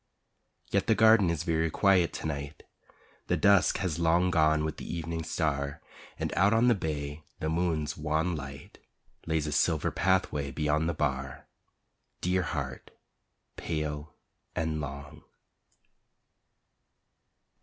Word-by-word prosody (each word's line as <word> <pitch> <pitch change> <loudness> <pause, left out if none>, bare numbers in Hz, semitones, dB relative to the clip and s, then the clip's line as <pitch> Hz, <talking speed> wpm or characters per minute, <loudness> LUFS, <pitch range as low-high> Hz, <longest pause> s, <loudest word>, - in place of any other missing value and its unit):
Yet - - +1
the 110 - +4
garden 110 -4 +6
is 85 -2 -1
very 80 -1 +1
quiet 95 0 +3
to - - -6
night, 70 -1 -5 0.6
The - - +1
dusk 100 -2 +4
has 90 -4 -2
long 85 +2 +3
gone 80 -2 +3
with 80 - -4
the - - -7
Evening 85 -1 -3
Star, 70 -4 -2 0.4
And - - -3
out 100 +5 +4
on 115 +2 +4
the - - +6
bay 75 -5 -4 0.2
the 80 - -2
moon's 80 -2 0
wan 80 +3 0
light 70 -2 -9 0.5
Lays 80 -2 0
a 75 - -3
silver 75 +1 +1
pathway 85 -6 +1
beyond 75 +2 0
the 85 - -2
bar, 65 -3 -2 0.7
Dear 90 +1 +1
heart, 70 -7 -4 0.7
pale 75 -2 -4 0.4
and 80 -1 -1
long. 70 0 -7
80 Hz, 130 wpm, -29 LUFS, 75-85 Hz, 0.7 s, garden